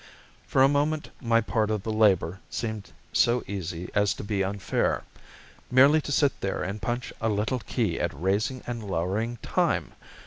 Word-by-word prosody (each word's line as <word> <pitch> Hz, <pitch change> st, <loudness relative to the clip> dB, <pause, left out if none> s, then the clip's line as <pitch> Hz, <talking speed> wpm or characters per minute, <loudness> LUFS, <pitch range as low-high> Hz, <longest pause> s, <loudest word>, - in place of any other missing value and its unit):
For 130 Hz, -, +4 dB
a -, -, +7 dB
moment 145 Hz, +2 st, 0 dB
my 115 Hz, -2 st, +3 dB
part 110 Hz, -1 st, 0 dB
of 105 Hz, -3 st, -1 dB
the 110 Hz, -, -2 dB
labor 100 Hz, -4 st, +3 dB
seemed 110 Hz, -3 st, -4 dB, 0.2 s
so 120 Hz, 0 st, +3 dB
easy 90 Hz, -3 st, -5 dB
as 105 Hz, -2 st, +2 dB
to -, -, -7 dB
be 100 Hz, -2 st, 0 dB
unfair. 100 Hz, 0 st, -1 dB, 0.7 s
Merely 140 Hz, +5 st, +6 dB
to 145 Hz, -, -6 dB
sit 145 Hz, -1 st, +2 dB
there 95 Hz, -, -2 dB
and 100 Hz, +4 st, -4 dB
punch 120 Hz, +1 st, -3 dB
a 115 Hz, -, +1 dB
little 110 Hz, +4 st, 0 dB
key 105 Hz, -6 st, -1 dB
at -, -, 0 dB
raising 100 Hz, +8 st, 0 dB
and 120 Hz, -1 st, -4 dB
lowering 100 Hz, +6 st, -1 dB
time! -, -, 0 dB
110 Hz, 170 wpm, -27 LUFS, 100-120 Hz, 0.7 s, a